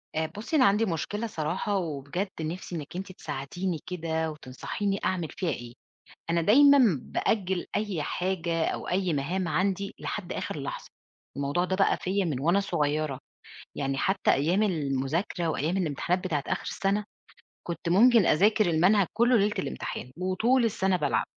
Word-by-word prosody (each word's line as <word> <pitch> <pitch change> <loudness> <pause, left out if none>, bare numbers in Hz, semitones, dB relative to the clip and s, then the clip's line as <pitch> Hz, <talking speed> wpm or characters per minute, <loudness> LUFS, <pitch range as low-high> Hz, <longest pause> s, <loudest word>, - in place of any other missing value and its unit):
آآ 160 0 +1
بُصّي، 230 +10 -3
أنا 265 -4 +6
عندي 210 +3 +4
مشكلة 205 +5 -2
صراحة، 190 +2 -2
وبجد 160 +2 -3
نِفسي 175 +3 -5
إنِك 155 0 -7
أنتِ 190 +1 -5
تساعديني 175 +3 -4
كده 160 -2 -2
وتنصحيني 155 +8 -3
أعمل 180 -3 0
فيها 180 - -2
إيه. 120 -5 -5 0.6
أنا 170 0 +2
دايمًا 255 - +6
بأجل 190 -4 -1
أي 205 -7 -1
حاجة 170 -1 -1
أو - - -3
أي 185 -1 +1
مهام 170 +6 -1
عندي 190 +4 0
لحد 190 -4 -4
آخر 150 - -4
لحظة، 140 - -5 0.5
الموضوع 140 +5 0
ده 185 +1 -1
بقى 195 - +3
فيّا 195 +2 -1
من 150 -7 -2
وأنا 170 +7 +3
صغيرة، 150 -6 -1 0.6
يعني 135 -1 -2
حتى 190 +6 +2
أيام 170 +9 +2
المذاكرة 160 0 -1
وأيام 160 +3 0
الامتحانات 175 +2 -1
بتاعة 155 -6 -1
آخر - - -2
السنة، 200 +2 -1 0.6
كنت 170 -1 -3
ممكن 225 +3 +6
أذاكر 210 +4 +4
المنهج 180 +4 +4
كلّه 235 +3 +4
ليلة 205 0 +2
الامتحان، 65 - -5
وطول 220 +8 +2
السنة 195 -4 +1
بالعب. 145 -4 0
180 Hz, 150 wpm, -28 LUFS, 155-200 Hz, 0.6 s, أنا